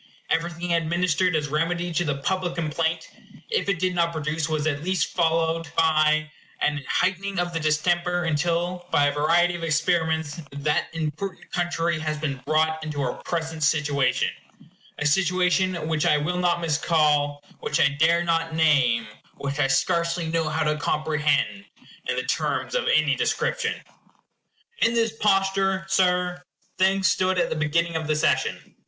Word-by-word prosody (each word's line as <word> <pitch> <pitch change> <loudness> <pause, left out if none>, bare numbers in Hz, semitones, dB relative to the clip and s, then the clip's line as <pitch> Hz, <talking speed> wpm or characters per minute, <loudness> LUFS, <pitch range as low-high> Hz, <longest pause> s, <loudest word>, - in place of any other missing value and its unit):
Everything 170 +1 -1
administered 170 +1 +1
as 150 -1 0
remedy 170 +3 -1
to 175 - +1
the 145 -4 -2
public 185 0 -1
complaint, 160 0 -1 0.4
if 450 - 0
it 200 - +1
did 185 +1 0
not 170 -1 +1
produce, 155 0 -2
was 155 -1 -1
at 145 -1 -1
least 185 -3 -1
followed 165 -1 +1
by, 155 -1 +3 0.3
an 150 -1 0
heightening 195 +1 0
of 175 0 -1
the 165 - -1
distemper; 175 +3 +1
until, 175 +3 -1
by 145 - +3
a 145 - +2
variety 165 +4 +2
of 175 -1 -6
experiments, 160 -1 0
that 145 +2 -1
important 165 +4 -5
country 170 -2 -1
has 155 -1 -2
been 145 -3 -3
brought 160 +1 +1
into 150 -2 -5
her 130 -3 -1
present 160 -2 -4
situation 145 -3 +1 0.7
a 150 - -3
situation 180 +1 +1
which 160 +1 0
I 150 -3 +4
will 175 +5 -1
not 175 -1 +1
miscall, 150 -2 +1 0.2
which 150 - -1
I - - +5
dare 160 +4 +2
not 165 -1 0
name, 130 -8 +3 0.3
which 140 +1 -4
I 140 - +3
scarcely 170 +5 +1
know 165 -1 0
how 160 +1 0
to 150 0 0
comprehend 150 +5 0 0.5
in - - +1
the - - -1
terms - - -2
of - - 0
any 475 - +3
description. 460 -2 -1 1.0
In 230 - +2
this 225 -1 +1
posture, 195 -2 +1
Sir, 180 -2 +1 0.4
things 190 0 +3
stood 185 0 +1
at - - +1
the - - 0
beginning 165 +2 0
of 160 -1 -2
the 155 - +1
session. 155 - 0
165 Hz, 160 wpm, -24 LUFS, 150-175 Hz, 1.0 s, I